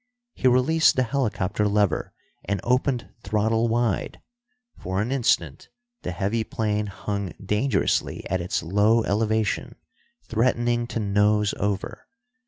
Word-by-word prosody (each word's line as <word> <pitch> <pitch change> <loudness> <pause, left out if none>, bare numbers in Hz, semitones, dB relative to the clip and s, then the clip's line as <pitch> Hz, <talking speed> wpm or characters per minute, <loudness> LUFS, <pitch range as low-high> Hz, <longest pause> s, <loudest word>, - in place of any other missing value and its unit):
He 130 - 0
released 130 +6 +4
the 130 - +2
helicopter 105 -6 -1
lever 100 -4 +1 0.3
and 100 -1 -2
opened 125 0 0
throttle 110 +3 +1
wide. 115 -2 -1 0.6
For 95 +1 -3
an 110 +5 -1
instant 85 - 0 0.3
the - - -4
heavy 100 +6 -1
plane 105 -1 -1
hung 100 -2 -4
dangerously 105 +3 0
at 95 -1 -1
its 90 +2 -2
low 105 +6 +3
elevation, 110 0 0 0.5
threatening 120 +1 +1
to 115 - -3
nose 105 0 +2
over. 100 -1 -3
105 Hz, 120 wpm, -24 LUFS, 100-120 Hz, 0.6 s, released